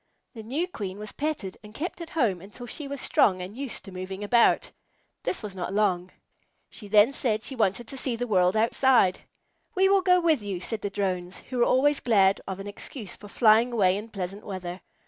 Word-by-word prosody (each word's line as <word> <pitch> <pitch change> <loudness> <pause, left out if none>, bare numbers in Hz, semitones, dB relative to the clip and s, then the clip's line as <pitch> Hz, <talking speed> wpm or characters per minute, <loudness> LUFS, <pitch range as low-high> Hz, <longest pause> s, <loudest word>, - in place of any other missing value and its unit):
The 225 - -8
new 275 +11 -2
Queen 200 - -6
was 210 0 -6
petted 290 -11 -4
and 210 +1 -13
kept 350 +3 -4
at 335 - -7
home 220 - 0
until 210 +6 -10
she 280 +5 -6
was 280 0 -5
strong 185 -6 +3
and 185 +3 -7
used 270 -2 -6
to 195 - -9
moving 185 +2 -6
about. 235 +3 +3 0.5
That 365 - -2
was 210 -2 -6
not 185 +1 -4
long. 185 -4 +1 0.7
Then 210 +2 +5
she - - -9
said 220 -5 0
she 270 - -4
wanted 220 0 0
to 270 - -7
see 255 -2 -1
the 245 +1 -2
world 185 -2 +2
outside. 230 -3 +3 0.6
"We 385 0 +4
will 395 -1 +4
go 360 -1 +4
with 320 -7 +2
you," 200 -3 -4
said 215 +4 -4
the 205 - -2
Drones, 185 -2 -3
who 250 - -2
were 240 - +5
always 290 +3 +3
glad 195 -5 +3
of 190 0 -4
an 195 - -6
excuse 205 0 -7
for 205 - -12
flying 225 +3 +4
away 190 -5 +3
in 210 +3 -6
pleasant 195 0 -5
weather. 185 -2 -6
215 Hz, 210 wpm, -26 LUFS, 190-255 Hz, 0.7 s, Then